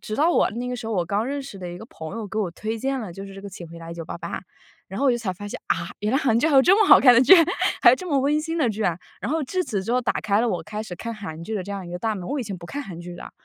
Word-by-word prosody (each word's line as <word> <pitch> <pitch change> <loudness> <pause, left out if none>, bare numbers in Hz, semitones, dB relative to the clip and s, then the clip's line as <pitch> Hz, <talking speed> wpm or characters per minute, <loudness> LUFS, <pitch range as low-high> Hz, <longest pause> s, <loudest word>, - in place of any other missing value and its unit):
直 215 - -5
到 315 +4 +4
我 - - +3
那 240 +3 -4
个 250 - -2
时 235 -2 -7
候， 225 - -2
我 180 -3 +1
刚 205 +5 0
认 280 +1 -3
识 265 -7 -9
的 180 -1 -6
一 175 - -7
个 220 - -9
朋 160 +1 -8
友， 225 -2 -4
给 215 +2 -4
我 200 -5 0
推 220 +5 -4
荐 270 +3 -1
了 200 -7 -6
就 195 +2 -8
是 195 - -11
这 195 - -10
个 200 - -7
《请 175 -3 -9
回 170 +1 -10
答 165 0 -8
1988》， 165 -1 -7 0.8
然 195 - -6
后 - - +1
我 - - +6
就 240 - 0
才 225 -5 -2
发 205 +3 -8
现， 205 - -6
啊？ - - -1
原 210 +1 0
来 - - +4
韩 235 -6 +2
剧 255 - +2
还 295 - +1
有 265 - +8
这 365 +6 +6
么 425 - +4
好 - - +10
看 250 -3 +7
的 235 - +6
剧， 260 +9 +9 0.5
还 - - +9
有 - - +6
这 370 -4 -7
么 285 -4 +2
温 290 +3 +2
馨 325 +2 -3
的 300 - +3
剧 215 +1 -3
啊。 175 -4 0 0.2
然 - - -3
后 320 +1 0
至 365 +7 -1
此 215 - -2
之 230 - -1
后 250 - +3
打 235 - -1
开 210 0 +2
了 240 - +1
我 - - -2
开 210 0 -5
始 200 -5 -7
看 230 +5 -5
韩 165 -7 -7
剧 220 - -4
的 195 - -2
这 200 - -8
样 195 -3 -5
一 175 - -8
个 175 - -4
大 220 +1 -1
门， 185 -3 -6
我 285 +1 -2
以 - - -2
前 200 -4 -5
不 170 - -11
看 285 +10 -5
韩 180 -9 -9
剧 175 0 -8
的。 175 - -9
215 Hz, 390 characters per minute, -24 LUFS, 190-260 Hz, 0.8 s, 好